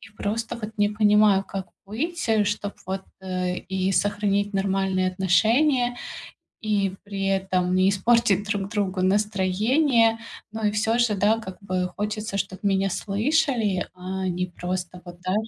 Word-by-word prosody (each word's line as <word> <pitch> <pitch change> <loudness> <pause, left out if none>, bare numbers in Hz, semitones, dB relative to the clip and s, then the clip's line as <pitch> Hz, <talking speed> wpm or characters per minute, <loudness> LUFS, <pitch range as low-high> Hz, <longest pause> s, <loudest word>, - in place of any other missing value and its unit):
И 200 - -14
просто 225 +3 -3
вот 215 0 -7
не 205 - +4
понимаю, 210 -2 +4
как 190 -2 -5 0.2
быть, 290 - -3 0.2
чтоб 205 0 -2
вот, 190 +1 -3 0.2
э, 185 -1 -2
и 190 0 -2
сохранить 205 0 +1
нормальные 195 -1 +1
отношения, 245 - +2 0.7
и 205 -3 +1
при 200 -1 -4
этом 190 -2 0
не 185 +1 +4
испортить 205 0 +3
друг 205 -2 -2
другу 195 -3 -1
настроение. 215 +5 +2 0.3
Ну 220 0 -6
и - - +4
всё 220 +2 +1
же, 235 -4 +3
да, 210 +3 +2
как 190 -4 -8
бы 185 -2 -1
хочется, 210 0 -3
чтобы 190 -1 -3
меня 195 -1 +2
слышали, 220 - 0
а 185 +1 -4
не 180 0 -1
просто 180 0 -5
вот 175 0 -11
да 185 +1 -1
200 Hz, 145 wpm, -24 LUFS, 190-215 Hz, 0.7 s, не